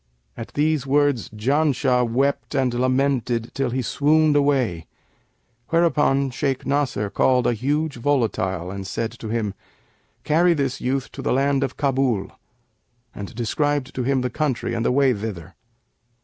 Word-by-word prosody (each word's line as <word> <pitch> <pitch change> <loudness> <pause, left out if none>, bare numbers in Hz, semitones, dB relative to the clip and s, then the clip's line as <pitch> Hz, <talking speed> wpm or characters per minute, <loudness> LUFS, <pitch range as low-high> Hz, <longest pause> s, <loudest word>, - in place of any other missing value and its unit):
At 115 - -9
these 150 -2 +1
words 145 -3 +2
Janshah 130 +2 +1
wept 140 +4 0
and 130 -3 +1
lamented 130 -2 0
till 135 -2 -1
he 130 +1 -2
swooned 150 +4 +3
away; 130 - +1 0.8
whereupon 150 -5 +2
Shaykh 130 +2 -2
Nasr 130 -8 -1
called 125 -2 +2
a - - +3
huge 145 +5 -1
volatile 110 - -1
and 95 -1 -6
said 115 +4 -3
to 110 - -6
him, 110 -3 -1 0.7
'Carry 170 +3 +3
this 135 -3 -2
youth 130 +1 -2
to - - -8
the - - -1
land 140 +1 +2
of 135 - -4
Kabul,' 130 -8 0 0.8
and 100 0 -8
described 135 +3 -1
to 130 - -3
him 130 +1 +1
the 125 -1 -2
country 135 -4 -1
and 115 0 -1
the - - +2
way 135 0 +3
thither. 100 -7 -6
130 Hz, 150 wpm, -22 LUFS, 115-145 Hz, 0.8 s, swooned